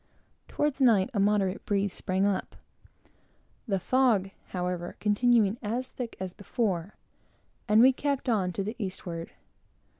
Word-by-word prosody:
Toward 295 -2 -1
night 225 -4 +4
a 205 - 0
moderate 200 -1 +1
breeze 200 -1 0
sprang 190 +1 0
up; 200 -2 -1 1.1
the 195 -3 0
fog 220 -3 +2 0.2
however 180 -1 -3
continuing 215 0 +3
as 245 +4 -3
thick 240 -3 -6
as 185 -1 -5
before; 200 -3 -2 0.7
and 215 +2 +5
we 260 +1 +7
kept 280 0 -2
on 200 -7 +1
to 195 - -2
the 215 +4 -4
eastward. 175 -4 -5
205 Hz, 130 wpm, -28 LUFS, 190-240 Hz, 1.1 s, we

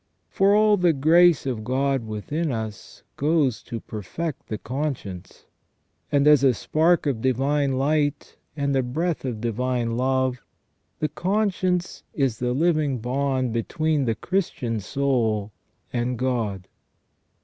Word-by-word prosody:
For 200 +1 +3
all 210 0 +5
the 175 -3 +3
grace 165 +3 +4
of 120 -5 -3
God 130 0 0
within 145 +10 -3
us 110 -3 -6
goes 145 -5 +1
to 115 - -6
perfect 125 - -6
the 110 - -3
conscience; 120 - -5 0.7
and 140 -1 +3
as 150 -3 +6
a 130 -3 +4
spark 165 - +2
of 130 -6 -1
divine 135 +2 +1
light 145 +2 0 0.2
and 140 -1 0
a 135 - +3
breath 155 +6 -2
of 120 -4 -3
divine 120 0 -1
love, 130 0 0 0.6
the 155 - 0
conscience 185 -2 -1
is 135 -6 0
the 125 0 0
living 155 -2 +1
bond 130 0 -1
between 150 +5 0
the 115 -2 0
Christian 140 - -2
soul 110 -3 0 0.4
and 120 0 -1
God. 110 -7 -2
135 Hz, 130 wpm, -24 LUFS, 120-155 Hz, 0.7 s, as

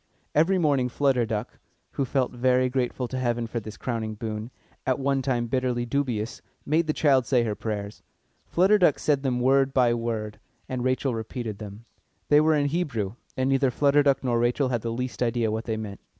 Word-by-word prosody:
Every 165 +6 +3
morning 140 -7 +2
Flutter 130 -3 +1
Duck, 110 +1 -4 0.3
who 140 - -1
felt 130 0 0
very 125 +1 +2
grateful 125 0 -1
to 130 +1 -4
Heaven 120 -2 0
for 115 +1 -3
this 110 -1 -9
crowning 110 -3 -3
boon, 110 +1 -5 0.3
at 130 -1 +1
one 135 0 0
time 125 -3 0
bitterly 125 0 -1
dubious, 120 -4 -2 0.2
made 160 +3 +1
the - - +2
child 135 -6 +3
say 125 -3 +3
her 110 -2 -1
prayers. 105 -1 -5 0.5
Flutter 195 +4 +4
Duck 175 -6 +4
said 145 -3 +1
them 130 -3 0
word 135 +1 +3
by 125 -3 +4
word, 115 -2 -3 0.3
and 125 -1 -3
Rachel 130 0 0
repeated 110 -2 -5
them. 105 +2 -9 0.4
They 150 0 +6
were 155 0 +3
in 145 -1 +2
Hebrew, 135 - -2 0.2
and 130 0 +1
neither 135 0 +3
Flutter 145 +3 +3
Duck 140 -1 +2
nor 120 -2 +1
Rachel 125 +3 +1
had 120 -3 -1
the 115 - -3
least 125 +2 -4
idea 115 -2 +1
what 110 +1 -3
they 110 -2 -2
meant. 105 -2 -6
125 Hz, 195 wpm, -26 LUFS, 115-135 Hz, 0.5 s, They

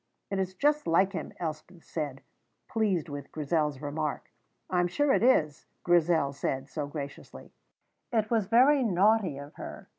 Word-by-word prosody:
"It 195 - -1
is 190 0 -2
just 295 +8 +1
like 190 +4 +3
him," - - -5
Elspeth 160 +1 -6
said, 145 -5 -5 0.4
pleased 200 -7 0
with 145 -2 -7
Grizel's 150 -2 -1
remark. 150 +1 -3 0.4
"I 180 - 0
am 175 - +3
sure 275 +10 +2
it - - +2
is," 155 - +2 0.2
Grizel 165 -5 +3
said, 135 -1 -3
so 150 0 -4
graciously. 145 -1 -8 0.6
It 220 -2 0
was 220 -4 +2
very 260 +6 +5
naughty 200 - +3
of 140 +1 -9
her. - - -9
170 Hz, 155 wpm, -29 LUFS, 150-210 Hz, 0.6 s, very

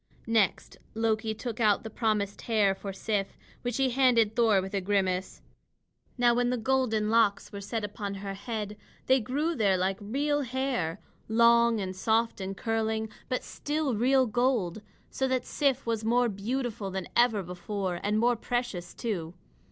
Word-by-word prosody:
Next 225 -5 +1 0.2
Loki 220 0 0
took 230 +1 -5
out 210 -3 +3
the 220 - -7
promised 210 -3 -1
hair 210 -4 +3
for 195 +1 -6
Sif, 195 0 -2 0.2
which 245 -1 -2
he 265 -1 +2
handed 235 -4 +3
Thor 225 -5 +4
with 190 +1 -5
a 200 - 0
grimace. 185 -1 -1 0.7
Now 240 -1 +4
when 245 0 +1
the 250 - 0
golden 225 -3 +1
locks 225 -3 +2
were 200 - -7
set 220 +2 -3
upon 205 -1 -4
her 195 0 -5
head, 210 0 -5 0.3
they 260 +1 +4
grew 290 +8 -1
there 200 - +2
like 190 +1 0
real 290 +8 0
hair, 255 - -2 0.3
long 235 0 +4
and 190 -1 -4
soft 225 +2 +1
and 190 +1 -4
curling 220 -1 -1 0.2
but 255 - -1
still 295 -2 -2
real 260 +4 +3
gold. 235 -5 0 0.3
So 265 - 0
that 255 -1 0
Sif 275 -2 0
was 225 -2 -1
more 240 +2 +3
beautiful 220 0 -3
than 190 -1 -4
ever 230 -4 +3
before, 180 +1 -4
and 210 +1 0
more 240 +2 +3
precious, 230 -7 -3
too. 180 -8 -3
220 Hz, 165 wpm, -28 LUFS, 200-245 Hz, 0.7 s, Thor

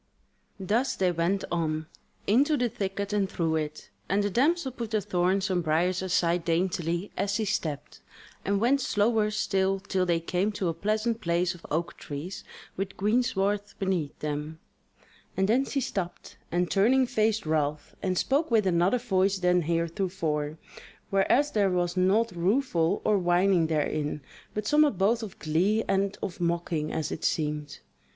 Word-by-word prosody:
Thus 220 +8 0
they 185 -2 +2
went 175 +4 0
on, 160 -2 -1 0.4
into 280 +8 +3
the 245 -2 +1
thicket 200 0 -3
and 200 -2 +1
through 165 -4 0
it, 155 -8 -5 0.2
and 200 +3 +2
the 205 - -1
damsel 285 - +2
put 235 -3 -5
the 215 -1 +1
thorns 190 0 0
and 175 -2 +1
briars 170 +4 +1
aside 175 -2 +1
daintily 170 +1 -1
as 200 0 -1
she 220 +1 0
stepped, 155 -9 -3 0.4
and 200 0 +1
went 260 +5 +3
slower 215 -1 +2
still 195 -2 0
till 190 -1 -1
they 170 -1 +2
came 180 +5 -1
to 190 -3 -1
a - - -1
pleasant 215 +6 -1
place 175 +1 +1
of 175 - -13
oak 170 +3 -2
trees 150 +6 -6 0.3
with 195 0 -4
greensward 205 -2 +1 0.2
beneath 185 -7 -1
them; 150 +1 -3 0.8
and 190 0 +2
then 250 +6 +3
she 275 - -1
stopped, 190 -8 -4 0.2
and 175 +1 0
turning, 255 +7 +4
faced 220 -3 0
Ralph, 150 -1 -1
and 185 -1 -1
spoke 285 - +1
with 225 -4 +3
another 180 +5 +3
voice 195 -4 +1
than 180 -1 +3
heretofore, 165 -2 -1 0.5
whereas 245 +9 +3
there 205 -2 +2
was 175 -1 0
naught 200 +5 +3
rueful 180 -1 +1
or 210 -2 +3
whining 175 -1 +3
therein, 150 -1 -1 0.3
but 210 0 -2
somewhat 295 -3 +3
both 220 +5 +2
of 215 -4 -7
glee 185 +8 +1
and 195 +1 0
of 180 -2 -5
mocking 170 -2 -1
as 160 - -2
it - - -5
seemed. 150 -2 -2
190 Hz, 160 wpm, -27 LUFS, 170-210 Hz, 0.8 s, turning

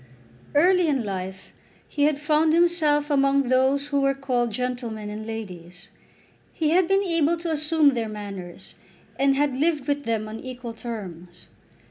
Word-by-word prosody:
Early 360 +3 +4
in 275 -5 +1
life 190 -1 -6 0.3
he 290 -1 0
had 300 -1 +2
found 305 +1 +2
himself 315 -4 +2
among 275 -2 +2
those 265 +3 +2
who 280 -1 +1
were 275 0 +2
called 250 -3 -1
gentlemen 235 -3 -4
and 215 +1 -7
ladies. 180 -6 -8 0.6
He 310 -2 0
had 360 +1 +4
been 390 +2 +3
able 335 -2 +1
to 335 0 -4
assume 310 0 +3
their 230 -3 -2
manners, 200 -4 -8 0.5
and 275 0 +3
had 285 -1 +1
lived 300 0 0
with 285 0 -1
them 220 -2 -1
on 220 +1 -7
equal 250 -2 -7
terms. 180 -7 -8
275 Hz, 155 wpm, -24 LUFS, 220-300 Hz, 0.6 s, Early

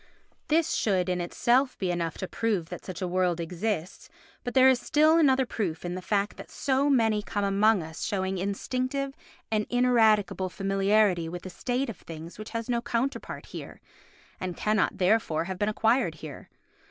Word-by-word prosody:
This 320 +1 +2
should 185 -4 +1
in 180 -1 0
itself 250 +9 +1
be 185 -2 -1
enough 170 -2 -2
to 190 - -4
prove 205 -8 -1
that - - -7
such 185 0 -6
a - - -1
world 180 -1 +1
exists, 175 +1 -3 0.3
but 245 - -5
there 260 0 +7
is 260 -2 +5
still 310 +5 +4
another 265 -4 +4
proof 180 -9 -3
in 175 - -3
the 185 - -5
fact 200 +1 -1
that - - -10
so 275 +1 +1
many 225 -6 +3
come 205 0 -3
among 200 0 +3
us 160 +1 -9
showing 190 -2 -1
instinctive 255 +8 -2 0.4
and 215 -1 0
ineradicable 220 -6 +3
familiarity 195 -2 +2
with 175 +2 -7
a 185 - -6
state 250 +7 -2
of 225 -7 -6
things 165 +3 -10
which 215 - -7
has 230 -1 -4
no 240 -1 0
counterpart 240 +3 -3
here, - - -9 0.6
and 180 -2 -4
cannot, 215 -1 +1
therefore, 180 -5 +2
have 185 +1 -5
been 205 - +1
acquired 220 -4 +2
here. 155 -3 -10
205 Hz, 175 wpm, -27 LUFS, 180-245 Hz, 0.6 s, there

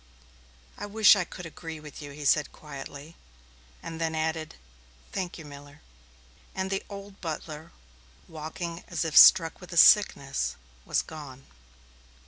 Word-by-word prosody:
"I 205 - -5
wish 215 +1 +6
I 185 - 0
could 180 +1 -10
agree 165 -1 -8
with 150 0 -11
you," 145 - -8
he 145 +1 -9
said 150 +1 +3
quietly, 145 +2 -10 0.7
and 165 0 -7
then 160 -1 -1
added, 160 0 -2 0.6
"Thank 180 -2 -4
you, 160 - -10
Miller." 145 0 -13 0.7
And 190 0 -3
the 195 - -1
old 200 -1 -10
butler, 160 -1 -6 0.6
walking 165 +2 -6
as 170 -1 -2
if 160 - -3
struck 165 -2 +7
with 180 - -12
a - - -4
sickness, 140 -8 +4 0.3
was - - 0
gone. 140 -4 -10
160 Hz, 140 wpm, -27 LUFS, 150-180 Hz, 0.7 s, struck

